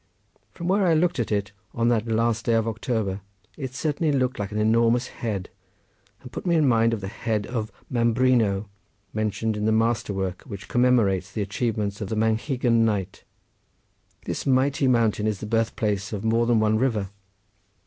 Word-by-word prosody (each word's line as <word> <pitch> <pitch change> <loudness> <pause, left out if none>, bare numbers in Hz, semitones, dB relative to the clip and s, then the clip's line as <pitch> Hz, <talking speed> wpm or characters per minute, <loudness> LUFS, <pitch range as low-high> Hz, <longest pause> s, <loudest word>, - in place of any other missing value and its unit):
From 170 +12 -7
where 195 0 +3
I 165 - +4
looked 175 -1 +1
at 115 - -1
it 100 -2 -1 0.2
on 115 0 +2
that 115 -1 +1
last 115 0 0
day 115 - +4
of 115 0 +1
October 110 -3 -2 0.3
it 135 -3 -5
was - - -25
certainly 155 0 0 0.2
like 100 -1 -4
an 105 - -3
enormous 115 +3 +2
head, 100 -6 -4 0.8
and 125 - -10
put - - -6
me 175 -2 +2
in 155 -3 +4
mind 115 -2 +3
of 105 - -8
the 95 - -4
head 110 0 -2
of 115 -2 -4 0.2
Mambrino 115 -4 +2 0.5
mentioned 110 +1 -1
in 105 0 -2
the 110 - +3
master 115 0 +1
work 95 -2 -3
which 100 -6 -9
commemorates 110 -7 +2
the 105 - -2
achievements 105 0 -2
of 100 - -4
the 110 - -2
Manchegan 115 +2 +1
knight. 100 -4 -2 1.0
This - - -4
mighty 135 +1 +2
mountain 115 -4 +2
is 105 -3 -1
the - - -6
birth 115 +1 0
place 105 -2 -1
of 105 -1 -4
more 115 +1 +2
than 120 -2 +3
one 110 0 +2
river. 110 -7 0
115 Hz, 180 wpm, -25 LUFS, 105-120 Hz, 1.0 s, I